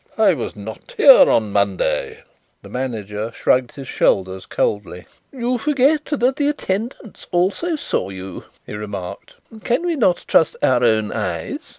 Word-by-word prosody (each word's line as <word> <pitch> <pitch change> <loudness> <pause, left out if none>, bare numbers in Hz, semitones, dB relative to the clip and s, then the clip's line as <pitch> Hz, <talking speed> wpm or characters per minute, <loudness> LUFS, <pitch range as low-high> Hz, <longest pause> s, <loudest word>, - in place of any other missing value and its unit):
"I - - +5
was - - -5
not 105 +2 -10
here - - +8
on 110 -3 +2
Monday." 100 -2 -1 0.4
The - - -12
manager 110 -4 -4
shrugged 125 +1 +1
his 135 -3 -9
shoulders 95 -3 0
coldly. 95 -4 -2 0.3
"You 250 -1 -2
forget 290 +3 +2
that 265 -2 0
the 285 - +1
attendants 220 -4 -4
also 195 - 0
saw 290 - -2
you," 95 -1 -8 0.2
he - - -9
remarked. 100 -4 -7 0.3
"Cannot 255 - +1
we - - -16
trust 160 - +3
our 125 -1 +3
own 110 -2 +2
eyes?" - - -3
130 Hz, 145 wpm, -20 LUFS, -, 0.4 s, here